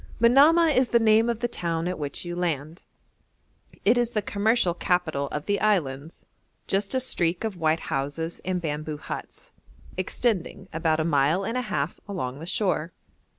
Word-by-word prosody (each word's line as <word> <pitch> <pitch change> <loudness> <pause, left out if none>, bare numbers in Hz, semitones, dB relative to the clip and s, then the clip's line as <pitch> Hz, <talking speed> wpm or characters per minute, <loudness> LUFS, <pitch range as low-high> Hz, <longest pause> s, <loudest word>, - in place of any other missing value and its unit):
Manamah 295 +8 +6
is 255 -1 +3
the 235 - +4
name 225 0 +4
of 235 -1 -2
the 240 - +1
town 170 -7 -2
at 180 -2 -3
which 145 +3 -3
you 175 0 -4
land; 165 -1 -3 1.0
it 235 +4 +5
is 240 -1 +1
the 210 -3 -2
commercial 205 -3 +1
capital 165 -6 0
of 150 +2 -5
the 205 0 0
islands 160 -8 -1 0.4
just 195 +5 -1
a - - +3
streak 175 -9 0
of 220 -3 -2
white 160 -1 +1
houses 150 +3 -3
and 185 0 -1
bamboo 155 -2 -4
huts, - - -8 0.5
extending 190 -1 -1
about 160 -1 +1
a - - +2
mile 155 +4 +2
and 230 - -3
a 255 - +1
half 150 - -3
along 135 -9 -4
the 165 - -8
shore. 180 -4 0
180 Hz, 170 wpm, -26 LUFS, 155-220 Hz, 1.0 s, Manamah